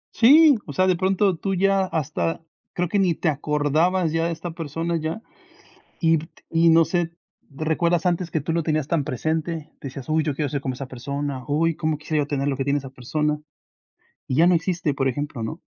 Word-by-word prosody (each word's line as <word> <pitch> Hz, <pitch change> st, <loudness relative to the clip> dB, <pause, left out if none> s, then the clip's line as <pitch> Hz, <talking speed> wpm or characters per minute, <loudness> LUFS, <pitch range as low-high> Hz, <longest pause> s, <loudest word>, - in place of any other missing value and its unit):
Sí, 285 Hz, +2 st, +7 dB
o 145 Hz, -, -6 dB
sea, 185 Hz, -, +3 dB
de 185 Hz, -1 st, +3 dB
pronto 190 Hz, +1 st, +1 dB
tú 195 Hz, +3 st, -2 dB
ya, 195 Hz, +1 st, +3 dB
hasta, 160 Hz, 0 st, -2 dB, 0.3 s
creo 180 Hz, 0 st, -1 dB
que 200 Hz, +4 st, 0 dB
ni 180 Hz, -4 st, +2 dB
te 165 Hz, -, 0 dB
acordabas 155 Hz, +4 st, +1 dB
ya 165 Hz, +1 st, +1 dB
de -, -, -2 dB
esta 165 Hz, +1 st, -5 dB
persona 165 Hz, +1 st, -3 dB
ya 160 Hz, +8 st, -4 dB, 0.8 s
y 165 Hz, -1 st, +4 dB, 0.3 s
y 165 Hz, 0 st, +4 dB
no 165 Hz, 0 st, +5 dB
sé, 175 Hz, -1 st, 0 dB, 0.4 s
¿recuerdas 160 Hz, +4 st, 0 dB
antes 175 Hz, 0 st, 0 dB
que 160 Hz, -, 0 dB
tú 160 Hz, +3 st, -2 dB
lo 170 Hz, -, +1 dB
tenías 155 Hz, -2 st, -1 dB
tan 160 Hz, -4 st, +1 dB
presente?, 160 Hz, +4 st, -2 dB
decías: 135 Hz, -2 st, -7 dB
"Uy, 155 Hz, +1 st, +2 dB
yo 150 Hz, -2 st, -1 dB
quiero 145 Hz, +1 st, -1 dB
ser 140 Hz, +1 st, -3 dB
como 130 Hz, -, -2 dB
esa 130 Hz, +1 st, -7 dB
persona, 140 Hz, +1 st, -4 dB
uy, 160 Hz, +2 st, +1 dB
cómo 155 Hz, -2 st, -1 dB
quisiera 155 Hz, 0 st, -1 dB
yo -, -, -4 dB
tener 140 Hz, -1 st, -1 dB
lo 135 Hz, -, -1 dB
que 135 Hz, -, -2 dB
tiene 140 Hz, +1 st, +1 dB
esa 135 Hz, -1 st, -8 dB
persona", 150 Hz, +4 st, -1 dB, 0.9 s
y 130 Hz, -, -1 dB
ya 165 Hz, +4 st, +5 dB
no 180 Hz, -, +5 dB
existe, 165 Hz, -2 st, 0 dB
por 135 Hz, -1 st, 0 dB
ejemplo, 140 Hz, -2 st, -3 dB
¿no? 110 Hz, -, -5 dB
160 Hz, 210 wpm, -23 LUFS, 145-170 Hz, 0.9 s, Sí